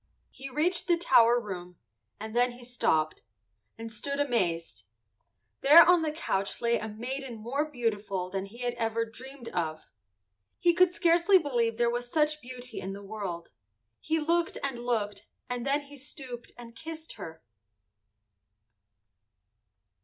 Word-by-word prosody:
He 270 +1 -7
reached 320 +7 +1
the 345 -2 +4
tower 240 -7 +5
room, 180 -5 -7 0.4
and 220 +2 -7
then 245 0 +3
he 245 0 -13
stopped, 160 -10 0 0.6
and 225 0 -7
stood 280 +6 -4
amazed. 170 - 0 0.8
There 315 +5 +9
on 355 -1 +6
the 315 -1 0
couch 200 -11 -2
lay 235 0 +2
a 220 - -4
maiden 245 +4 -5
more 265 +8 -2
beautiful 210 -8 -2
than 195 +1 -4
he 235 +5 -9
had 245 -1 0
ever 225 0 0
dreamed 250 +2 -10
of. 160 -3 -2 0.7
He 345 - +3
could 365 0 +5
scarcely 345 +2 +5
believe 240 -8 0
there 240 0 +3
was 245 0 -3
such 305 -1 +1
beauty 250 -1 -7
in 190 +1 -4
the 200 +1 -9
world. 195 -5 -5 0.5
He 320 +1 0
looked 335 +2 +1
and 270 -4 -2
looked 225 -4 -2 0.2
and 245 +1 -3
then 285 +2 +2
he 285 0 -13
stooped 260 -3 -8
and 235 -1 -11
kissed 320 0 -7
her. 160 -2 -9
245 Hz, 145 wpm, -29 LUFS, 215-290 Hz, 0.8 s, There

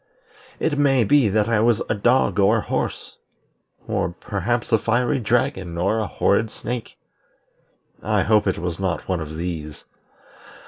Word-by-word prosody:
It 145 -3 0
may 135 -4 +4
be 130 +1 +4
that 105 +1 +1
I 115 -2 +2
was 115 0 +2
a - - +1
dog 110 -2 +2
or 100 +3 +4
a - - -1
horse, - - -4 0.7
or - - -1
perhaps 105 +6 -3
a 110 - +4
fiery 120 +5 +1
dragon 110 -7 -1
or 100 +6 +1
a 110 - -2
horrid 110 +2 +1
snake. 120 +2 -6 1.0
I 105 -2 +1
hope 105 -1 +3
it 95 - 0
was 85 0 -4
not 95 -3 -2
one 90 -2 -1
of 80 0 -6
these. 80 -3 -5
105 Hz, 155 wpm, -22 LUFS, 95-120 Hz, 1.0 s, may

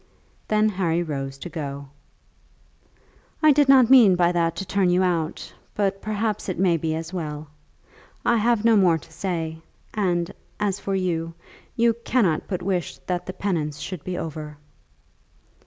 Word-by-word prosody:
Then 215 0 +3
Harry 175 -4 0
rose 135 -4 -4
to 135 - -7
go. 140 -4 -6 1.5
"I 310 - +8
did 285 -1 +3
not 260 -3 +6
mean 230 -8 +8
by 175 -1 +3
that 170 -1 0
to 195 - -4
turn 190 0 +1
you 180 +1 +3
out, 165 -3 -2 0.2
but 195 -1 0
perhaps 215 -1 -2
it 185 - -3
may 180 -1 +3
be 160 0 -1
as 165 +2 -6
well. 155 -3 -5 0.8
I 235 - +4
have 230 0 +2
no 230 -1 +6
more 180 -5 +4
to 155 - -15
say, 165 -4 -3 0.3
and 175 -5 0 0.3
as 205 -2 0
for 195 - -2
you, 165 -3 -2 0.4
you 235 -1 +3
cannot 195 -11 +1
but 180 -3 -3
wish 180 -3 -2
that 180 -1 -3
the 185 - -4
penance 160 -8 -2
should 155 +2 -6
be 180 -1 -4
over." 150 -2 -6
180 Hz, 160 wpm, -24 LUFS, 160-205 Hz, 1.5 s, I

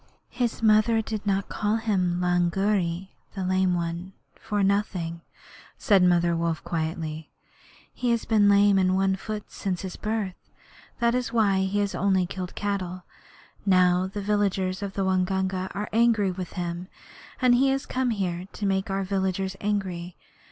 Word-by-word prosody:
'His 240 -2 -2
mother 215 +1 +4
did 215 -1 -5
not 195 -1 +1
call 210 +1 -1
him 190 -6 0
Lungri 180 +1 +1 0.3
[the 190 - -3
Lame 185 -1 +2
One] 170 +2 -4 0.2
for 205 -2 -2
nothing,' 185 -4 0 0.6
said 200 -4 +4
Mother 175 -1 +3
Wolf, 165 -2 -1
quietly. 160 -1 -3 0.6
He 250 - -2
has 235 -1 +1
been 210 -2 +4
lame 200 -1 +5
in 185 0 +2
one 190 0 +2
foot 210 +1 -6
from 190 -2 -2
his 185 +1 -6
birth. 215 -3 -2 0.7
That 235 0 +2
is 250 -2 -1
why 210 -5 +3
he 195 +2 -1
has 200 -1 -1
only 190 -1 +2
killed 180 0 -6
cattle. 185 -3 -3 0.6
Now 185 -1 +4
the 205 +2 -5
villagers 195 -2 0
of 200 -1 -4
the 195 - -1
Waingunga 190 0 0
are 205 +1 -3
angry 225 -4 +3
with 180 -1 -6
him, 175 0 -4 0.5
and 255 -2 +4
he 260 +3 +4
has 270 0 0
come 255 -1 -1
here 185 -5 -2
to 205 - -4
make 195 +1 0
our 195 0 -1
villagers 190 0 -1
angry. 185 -4 -2
190 Hz, 160 wpm, -26 LUFS, 180-210 Hz, 0.7 s, lame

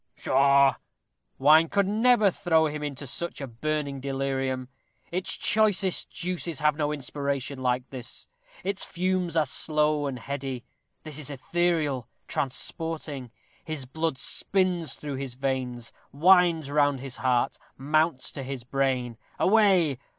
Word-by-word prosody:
Pshaw! 140 +1 +4 0.6
wine 155 +4 +6
could 200 -1 +2
never 220 0 +4
throw 160 -2 +2
him 150 0 -3
into 145 -1 -4
such 170 +6 -3
a 140 - -4
burning 140 +3 -3
delirium. 135 -1 -2 0.4
Its 185 +2 -1
choicest 205 -4 +2
juices 175 -3 -3
have 150 -1 +3
no 150 -1 -1
inspiration 140 -1 -3
like 125 0 0
this. 125 -3 -6 0.4
Its 195 -1 -2
fumes 180 -2 -1
are 155 - +4
slow 150 +1 0
and 135 -2 -4
heady. 135 -1 -5 0.4
This 155 -1 -4
is 150 - -3
ethereal, 150 -3 0 0.2
transporting. 145 0 -1 0.3
His 155 -5 -4
blood 160 +2 -2
spins 180 +3 +1
through 145 -3 -5
his 135 -2 -5
veins; 130 -3 -3 0.2
winds 170 -1 +4
round 145 -2 +2
his 135 0 -7
heart; 125 -2 +1 0.2
mounts 155 0 +1
to 140 - -6
his 135 -2 -5
brain. 125 -2 -1 0.2
Away! 185 - +4
145 Hz, 130 wpm, -27 LUFS, 135-165 Hz, 0.6 s, wine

